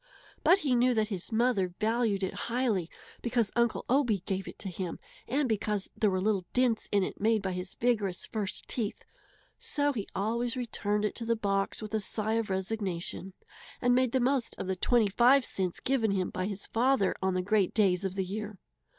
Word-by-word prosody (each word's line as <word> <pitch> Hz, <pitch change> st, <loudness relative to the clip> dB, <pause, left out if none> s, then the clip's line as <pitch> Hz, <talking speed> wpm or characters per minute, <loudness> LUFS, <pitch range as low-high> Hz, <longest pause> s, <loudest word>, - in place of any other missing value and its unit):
But 345 Hz, +5 st, +6 dB
he 265 Hz, -, +3 dB
knew 245 Hz, 0 st, +3 dB
that 215 Hz, -1 st, +1 dB
his 190 Hz, -1 st, -4 dB
mother 220 Hz, -6 st, +1 dB
valued 220 Hz, -2 st, +1 dB
it 190 Hz, -, -1 dB, 0.2 s
highly 230 Hz, -8 st, 0 dB, 0.3 s
because 235 Hz, -3 st, 0 dB
Uncle 235 Hz, -1 st, +1 dB
Obie 245 Hz, -8 st, +2 dB
gave 190 Hz, -1 st, -2 dB
it -, -, -8 dB
to -, -, -5 dB
him 180 Hz, -1 st, -4 dB, 0.3 s
and 275 Hz, +3 st, +1 dB
because 210 Hz, -2 st, -1 dB
there 215 Hz, -, +2 dB
were 185 Hz, -1 st, 0 dB
little 195 Hz, -2 st, 0 dB
dents 250 Hz, -3 st, +1 dB
in 200 Hz, -2 st, +3 dB
it -, -, -5 dB
made 220 Hz, -1 st, +2 dB
by 190 Hz, -, -1 dB
his 180 Hz, +1 st, -5 dB
vigorous 210 Hz, -6 st, 0 dB
first 210 Hz, -3 st, -4 dB
teeth; 220 Hz, -5 st, -3 dB, 0.5 s
so 290 Hz, -12 st, 0 dB
he 210 Hz, -6 st, -4 dB
always 235 Hz, +4 st, -1 dB
returned 210 Hz, -4 st, -1 dB
it 210 Hz, -, -1 dB
to 230 Hz, -, -5 dB
the 230 Hz, 0 st, +2 dB
box 195 Hz, -1 st, -1 dB
with 215 Hz, -, -7 dB
a 220 Hz, -, +2 dB
sigh 215 Hz, +1 st, 0 dB
of 225 Hz, -2 st, 0 dB
resignation, 190 Hz, -1 st, -3 dB, 0.5 s
and 245 Hz, 0 st, +3 dB
made 255 Hz, -1 st, +3 dB
the 260 Hz, -, +2 dB
most 255 Hz, -1 st, +1 dB
of -, -, -4 dB
the 190 Hz, 0 st, -1 dB
twenty 235 Hz, +4 st, +3 dB
five 245 Hz, +6 st, +5 dB
cents 185 Hz, -3 st, -2 dB
given 255 Hz, -4 st, +1 dB
him 190 Hz, -2 st, 0 dB
by 185 Hz, +1 st, -2 dB
his 200 Hz, -1 st, -5 dB
father 235 Hz, -4 st, +2 dB
on 190 Hz, -1 st, +1 dB
the 180 Hz, -, 0 dB
great 205 Hz, -1 st, +2 dB
days 195 Hz, -4 st, +3 dB
of 190 Hz, -1 st, -2 dB
the 190 Hz, -1 st, -1 dB
year. 210 Hz, +2 st, -5 dB
215 Hz, 200 wpm, -30 LUFS, 195-240 Hz, 0.5 s, But